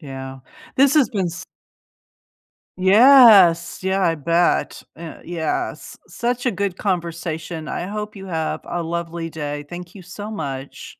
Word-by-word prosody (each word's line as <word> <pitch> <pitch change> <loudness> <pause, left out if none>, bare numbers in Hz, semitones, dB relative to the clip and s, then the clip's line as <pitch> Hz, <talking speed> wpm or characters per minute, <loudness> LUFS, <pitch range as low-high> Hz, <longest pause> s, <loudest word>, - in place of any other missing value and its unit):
Yeah, 135 -3 -8 0.4
this 275 +1 +4
has 290 -7 +4
been 190 -4 -1
s 170 0 -6 1.4
Yes, 200 -5 +6
yeah, 190 +1 0
I 165 -2 +2
bet, 170 +3 0
an 165 0 -10
yes, 165 -2 -4
such 245 +1 -3
a 240 - +2
good 195 -1 -2
conversation, 170 -3 -3
I 175 - -4
hope 210 +1 -5
you 195 -1 -10
have 160 -3 -3
a 175 - -4
lovely 170 0 -4
day, 145 -2 -5
thank 175 +2 -9
you 190 - -11
so 205 +4 -8
much. 140 -9 -7
175 Hz, 140 wpm, -21 LUFS, 160-200 Hz, 1.4 s, Yes